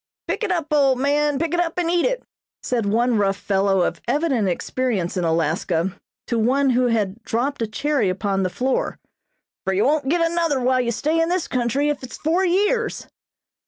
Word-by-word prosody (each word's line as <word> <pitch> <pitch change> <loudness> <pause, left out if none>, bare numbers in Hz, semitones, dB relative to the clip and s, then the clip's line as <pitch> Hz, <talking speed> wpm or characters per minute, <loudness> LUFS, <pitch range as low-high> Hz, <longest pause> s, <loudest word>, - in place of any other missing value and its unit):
"Pick - - -2
it 420 - 0
up, 325 -4 -1
old 275 -3 +4
man, 290 +2 +1
pick 330 +2 -1
it 350 - +1
up 345 0 -1
and 350 -2 0
eat 350 +4 +2
it," - - -2 0.4
said 235 -5 -1
one 230 +2 +2
rough 195 -1 +1
fellow 195 -1 +1
of 170 -1 -2
evident 280 -9 +1
experience 200 0 -1
in 180 - -1
Alaska 165 +2 0 0.3
to 235 - -1
one 265 +4 +2
who 250 0 +2
had 215 -2 -1
dropped 245 +5 -2
a 225 - 0
cherry 270 -1 0
upon 195 +1 -1
the 185 - 0
floor, 255 +7 -1 0.7
"for 190 - -1
you 195 - +2
won't 285 -1 +1
get 340 +3 +2
another 330 -4 0
while 255 0 +2
you 235 -1 -1
stay 310 +8 0
in 330 - +1
this 360 -1 0
country, 255 +3 0
if 295 -2 -2
it 255 - -9
is - - -7
four 335 +5 +1
years!" 415 +5 +1
255 Hz, 200 wpm, -22 LUFS, 205-310 Hz, 0.7 s, old